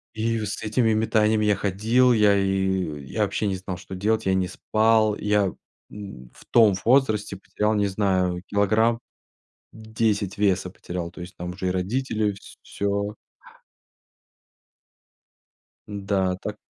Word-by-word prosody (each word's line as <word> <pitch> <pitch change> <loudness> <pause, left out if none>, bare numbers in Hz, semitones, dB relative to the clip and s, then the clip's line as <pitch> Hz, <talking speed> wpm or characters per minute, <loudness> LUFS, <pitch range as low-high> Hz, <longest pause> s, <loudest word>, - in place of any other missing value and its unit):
И 115 +1 0
вот 105 -2 -3
с 100 - -5
этими 110 +1 +1
метаниями 110 0 +2
я 105 -1 +3
ходил, 110 +7 +2
я 105 -3 +4
и 95 -6 -1
я - - -2
вообще 105 - -1
не 95 -2 -1
знал, 95 -1 -6
что 95 - -9
делать, 110 +3 0
я 95 - +3
не 95 -1 +1
спал, 110 +3 +2
я, 105 -2 +1 0.4
м, 95 -13 -10
в - - -17
том 110 -4 +5
возрасте 110 -5 +2
потерял, 105 +2 -1
не 105 -1 +1
знаю, 95 -3 0
килограмм 110 +3 +2 0.7
10 110 -3 -2
веса 95 -2 +1
потерял, 90 -1 -6
то 85 - -14
есть 90 +2 -9
там 90 0 -6
уже 95 +1 -4
и - - +1
родители, 105 +2 -1 0.3
всё. 100 +1 -2 2.7
Да, 95 -2 -1
так - - -5
100 Hz, 140 wpm, -24 LUFS, 95-110 Hz, 2.7 s, том